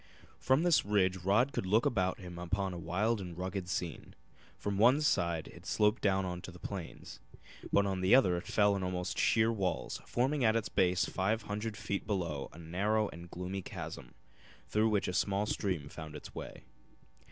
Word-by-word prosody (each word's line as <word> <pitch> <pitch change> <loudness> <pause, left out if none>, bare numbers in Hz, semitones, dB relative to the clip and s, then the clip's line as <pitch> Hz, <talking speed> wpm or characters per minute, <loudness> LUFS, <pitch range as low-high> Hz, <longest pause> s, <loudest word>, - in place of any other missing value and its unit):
From 130 +5 +3
this 175 -3 +4
ridge 95 -2 +2
Rod 100 +9 +2
could 95 - -2
look 110 +5 +3
about 95 -5 +1
him 90 -2 -9
upon 95 +2 -1
a - - -5
wild 100 +6 0
and 90 -3 -7
rugged 95 0 -4
scene. 90 -2 -4 0.5
On 100 -1 0
one 125 +6 +6
side 85 - +1
it - - -13
sloped 105 +2 +2
down 95 -3 0
to - - -8
the 90 - -11
plains, 90 -1 -7 0.5
but 100 - +4
on 95 -2 -1
the 95 +6 +6
other 95 -9 +5
it 85 - -5
fell 105 -1 +3
in 100 - -2
almost 90 -1 -2
sheer 110 +1 +4
walls, 95 -5 -2
forming 135 +3 +1
at 110 -1 +4
its 115 - 0
base 90 0 +2
five 105 +4 0
hundred 105 +1 -4
feet 100 -2 -3
below 85 -9 -2
a - - -14
narrow 100 +6 0
and 85 +1 -10
gloomy 90 +3 -4
chasm, - - -8 0.5
through 110 +1 +2
which 105 -2 +1
a 90 - -2
small 100 +4 +1
stream 90 -8 -2
found 75 +1 -8
its 75 - -9
way. - - -8
95 Hz, 185 wpm, -33 LUFS, 90-105 Hz, 0.5 s, one